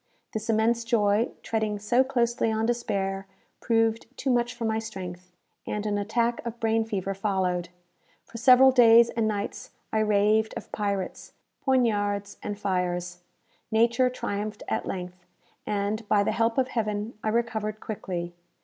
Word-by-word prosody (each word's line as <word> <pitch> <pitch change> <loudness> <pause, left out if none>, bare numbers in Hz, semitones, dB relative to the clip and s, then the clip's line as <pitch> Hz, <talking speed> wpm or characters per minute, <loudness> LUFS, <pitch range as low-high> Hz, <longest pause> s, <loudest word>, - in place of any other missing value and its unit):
This 220 +1 -4
immense 225 +2 +2
joy, 225 -1 +2
treading 220 -2 -1
so 225 +5 +3
closely 235 -3 0
on 220 0 0
despair, 200 -5 -1 0.3
proved 225 -1 +1
too 270 - 0
much 240 0 +1
for 235 -1 -4
my 220 0 0
strength, 185 -5 -7 0.4
and 210 0 -3
an 205 -1 0
attack 235 +3 0
of 235 0 -6
brain 225 0 +2
fever 195 -3 -2
followed. 185 -3 -1 0.6
For 230 - -9
several 255 +2 +7
days 235 -2 +7
and 225 -1 0
nights 205 -1 -3 0.2
I 220 - +2
raved 215 +1 +2
of 230 - -9
pirates, 200 -3 -3 0.3
poignards, 205 -6 +1
and 205 -1 -4
fires. 180 -3 -2 0.5
Nature 235 +3 +3
triumphed 210 -3 -4
at - - -2
length; 180 -1 -6 0.4
and, 210 +2 -2
by 205 -1 +3
the - - 0
help 230 +1 +1
of 255 -1 +2
Heaven, 215 -1 -2
I 215 - +1
recovered 220 -2 -1
quickly. 180 -5 -5
215 Hz, 150 wpm, -27 LUFS, 200-230 Hz, 0.6 s, several